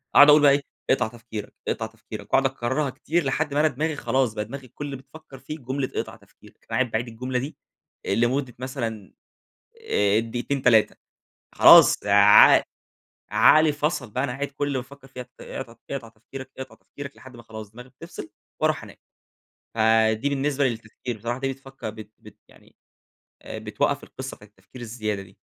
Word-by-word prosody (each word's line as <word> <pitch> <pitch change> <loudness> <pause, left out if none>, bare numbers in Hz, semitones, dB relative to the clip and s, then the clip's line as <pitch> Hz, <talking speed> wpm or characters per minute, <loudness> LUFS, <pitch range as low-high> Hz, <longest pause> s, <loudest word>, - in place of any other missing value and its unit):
أقعد 145 +1 +9
أقول 150 +1 +8
بقى 145 -1 +7
إيه، 140 +1 +2 0.3
أقطع 125 -4 +3
تفكيرك، 110 -2 -8
أقطع 110 - -1
تفكيرك 110 -2 -10
وأقعد 135 - +4
أكررها 135 +2 -1
كتير 165 +6 -1
لحد 145 +2 -1
ما 145 - +1
أنا 155 - +5
دماغي 155 +2 -2
خلاص، 130 -5 0
بقى 105 -1 -3
دماغي 130 +3 -9
كل 145 +5 -8
اللي 140 -1 -5
بتفكر 135 +1 -14
فيه 155 +3 -7
جملة 130 +1 -3
اقطع - - -3
تفكيرك. - - -21
فقاعد 130 -3 0
باعيد 115 +3 -1
الجملة 125 +2 -3
دي، 140 +5 -6 0.5
آآ، 100 - 0
لمدة 125 +2 0
مثلًا، 115 -6 -5 0.8
آآ، 105 +1 +3
دقيقتين، 120 +4 -3
3 115 -4 +4 0.6
خلاص - - +8
ع 100 0 +8 0.7
عقلي 155 0 +6
فصل 145 -4 -2
بقى 130 - -1
أنا 140 - -1
قاعد 140 +3 -3
كل 145 +1 -3
اللي 140 -2 -1
بافكر 135 +2 -9
في 130 -2 -8
ت 125 +1 -20
اقطع 120 -3 -7
ت - - -30
اقطع 135 -4 -4
تفكيرك، 130 +4 -11
أقطع 130 -1 -8
تفكيرك 140 -1 -10
لحد 130 -1 -14
ما 120 - -13
خلاص 110 -2 -9
دماغي 125 +3 -12
بتفصل 130 -4 -10 0.3
وأروح - - +1
أنام. - - -12 0.8
فدي 110 +2 +3
بالنسبة 140 0 0
للتفكير، 115 0 -4
بصراحة 120 +4 -4
دي 135 0 -1
بتفكر 135 -3 -8
بت 110 0 -12
بت 105 -1 -16
يعني - - -22 0.7
آآ، - - -7
بتوقَّف - - -1
القِصة 130 0 -8
نبتاعة 105 0 -17
التفكير 105 +5 -15
الزيادة 110 -3 -3
دي. 95 0 -19
125 Hz, 180 wpm, -24 LUFS, 110-140 Hz, 0.8 s, أقعد